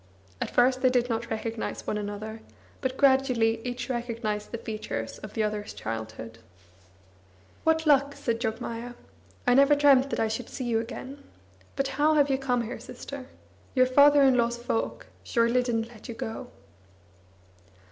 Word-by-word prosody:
At - - -1
first 255 +1 +3
they 255 - +5
did 245 -1 +1
not 230 0 -2
recognise 225 0 -4
one - - -1
another, 210 +2 -5 0.4
but 260 0 -2
gradually 255 -5 +3
each 245 0 -4
recognised 230 -4 -3
the 230 - -3
features 215 - -5
of 215 - -10
the 220 - +1
other's 210 0 -3
childhood. 110 0 -6 1.3
"What 320 0 +3
luck!" 280 -1 +4
said 230 -2 -2
Jogmaya. 230 +1 -4 0.5
"I 245 - +5
never 280 +3 +6
dreamt 280 -2 +5
that - - -2
I 225 - +2
should 225 +2 -4
see 260 - -5
you 230 -2 +1
again. 265 +4 -7 0.5
But 275 - 0
how 305 +3 +2
hate 285 -2 +4
you 265 - +1
come 250 -3 0
here, 230 - -6
sister? 275 -2 -8 0.5
Your 255 -1 +6
father 285 +2 +6
in 265 -2 +5
law's 235 0 +1
folk 235 -1 -2 0.2
surely 235 +1 +2
didn't 230 -2 -1
let 235 -1 -13
you 235 - -5
go!" 245 +1 -5
240 Hz, 160 wpm, -27 LUFS, 225-265 Hz, 1.3 s, never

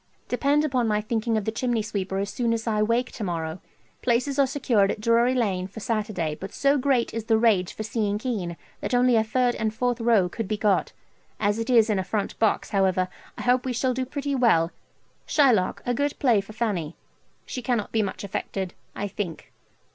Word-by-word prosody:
Depend 285 +4 +2
upon 255 -5 +1
my 210 -1 +2
thinking 220 +1 -1
of 210 - -2
the 220 - 0
chimney 235 -1 -1
sweeper 195 -2 -3
as 200 0 -2
soon 235 -2 0
as 230 0 -2
I 215 -2 +1
wake 235 +4 +1
to 225 - -6
morrow. 165 -2 -3 0.4
Places 255 +4 +1
are 275 - +5
secured 245 -7 +2
at - - -2
Drury 235 +3 +3
Lane 190 -7 0
for 200 +3 -10
Saturday, 210 -8 -2
but 190 +6 -7
so 280 +1 +3
great 260 -3 +1
is 225 -1 -4
the 225 -1 +3
rage 210 -6 +3
for 215 - -5
seeing 210 -1 -1
Kean 210 -8 -3 0.2
that - - -1
only 245 0 +4
a 220 - +4
third 245 +2 +1
and 220 -2 -1
fourth 245 +2 -1
row 225 -6 +4
could 220 +3 -5
be 215 +1 -1
got; 205 -2 +1 0.5
as 205 +1 +1
it 230 - -3
is 230 -3 +5
in 210 -3 +1
a - - 0
front 205 +1 -3
box, 220 - +1
however, 185 -2 +2 0.3
I - - -5
hope 250 0 +3
we 255 - -2
shall 255 +2 +1
do 255 +1 -2
pretty 285 +1 -3
well 220 -11 +3 0.6
Shylock, 245 -11 +3
a 245 - +1
good 285 +3 -1
play 235 -7 +3
for 200 +2 -12
Fanny 195 -9 -2 0.5
she 250 - -5
cannot 240 -4 -1
be 220 - +2
much 200 -1 -4
affected, 190 -1 -4 0.2
I 205 - -2
think. 185 -4 -6
220 Hz, 210 wpm, -25 LUFS, 200-245 Hz, 0.6 s, are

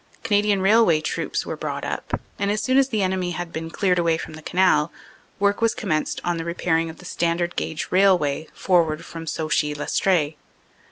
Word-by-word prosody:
Canadian 205 -3 +2
Railway 195 -5 +5
Troops 155 - -2
were - - -4
brought - - -4
up, - - -3 0.2
and 200 0 0
as 210 +1 +1
soon 260 +3 +3
as 270 0 +3
the 215 -5 0
enemy 185 -1 -1
had 175 -1 -5
been 165 +1 -4
cleared 180 0 +1
away 165 -1 +2
from 160 - -7
the 155 - -10
Canal, 180 -2 +2 0.5
work 200 +1 +2
was 230 -1 +2
commenced 155 -7 -1
on 175 -1 -1
the 165 - -3
repairing 165 -1 0
of 160 - -10
the 180 - -14
standard 170 0 -1
gauge 155 -1 -3
railway 180 -6 +3
forward 165 -4 +1
from 165 -1 -8
Sauchy 150 -2 0
Lestree. 155 0 +1
175 Hz, 185 wpm, -23 LUFS, 160-195 Hz, 0.5 s, Railway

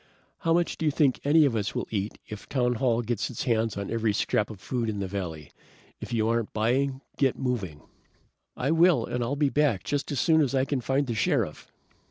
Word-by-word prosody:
How 165 - 0
much 170 +1 +1
do 160 - -1
you - - +3
think 140 -3 +2
any 150 +2 +5
of 130 -5 +1
us 100 -2 -2
will - - -2
eat 105 -1 -2
if 105 -2 -9
townhall 125 -2 +1
gets 115 -1 -2
its 125 - -4
hands 115 -4 0
on 100 -1 -4
every 115 -2 +1
scrap 105 +1 0
of 105 -4 -9
food 120 +1 -2
in 105 - -3
the 100 - -2
valley? 85 -6 -5 0.5
If - - -8
you 110 -2 +1
aren't 115 -1 0
buying, 130 +5 0 0.2
get 135 -3 +2
moving!" 105 - -3 0.8
"I 135 +4 0
will, 170 +1 +4
and 125 0 -2
I'll 130 +5 -1
be 145 -1 +2
back 140 -10 +1
just 145 +1 -2
as 140 - -1
soon 160 +1 +4
as 140 -2 +1
I 130 0 +2
can 135 -2 -1
find 135 +4 +1
the 120 - -3
Sheriff!" 110 -4 -1
125 Hz, 220 wpm, -27 LUFS, 110-140 Hz, 0.8 s, any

